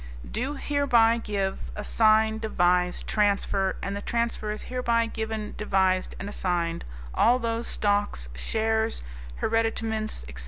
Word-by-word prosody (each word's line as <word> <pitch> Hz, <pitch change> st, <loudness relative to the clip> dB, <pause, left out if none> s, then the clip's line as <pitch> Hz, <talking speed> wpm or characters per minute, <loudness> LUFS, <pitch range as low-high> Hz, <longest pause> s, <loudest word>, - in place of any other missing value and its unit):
" -, -, -11 dB
do 270 Hz, +4 st, -2 dB
hereby 245 Hz, -6 st, +3 dB
give, 195 Hz, -3 st, -2 dB, 0.2 s
assign, 220 Hz, +1 st, +3 dB
devise, 180 Hz, -4 st, +1 dB
transfer, 200 Hz, -2 st, +1 dB
and 195 Hz, -, -2 dB
the 200 Hz, -, -4 dB
transfer 235 Hz, -2 st, -1 dB
is 210 Hz, -, -4 dB
hereby 235 Hz, -2 st, +1 dB
given, 220 Hz, -1 st, -4 dB
devised 190 Hz, -3 st, +1 dB
and 195 Hz, -, -5 dB
assigned, 175 Hz, -4 st, -1 dB, 0.3 s
all 240 Hz, +3 st, +4 dB
those 230 Hz, -1 st, -2 dB
stocks, 205 Hz, -, 0 dB
shares, 220 Hz, -, -1 dB, 0.4 s
hereditaments, 225 Hz, -, -1 dB
etc. -, -, -9 dB
215 Hz, 125 wpm, -26 LUFS, 195-230 Hz, 0.4 s, all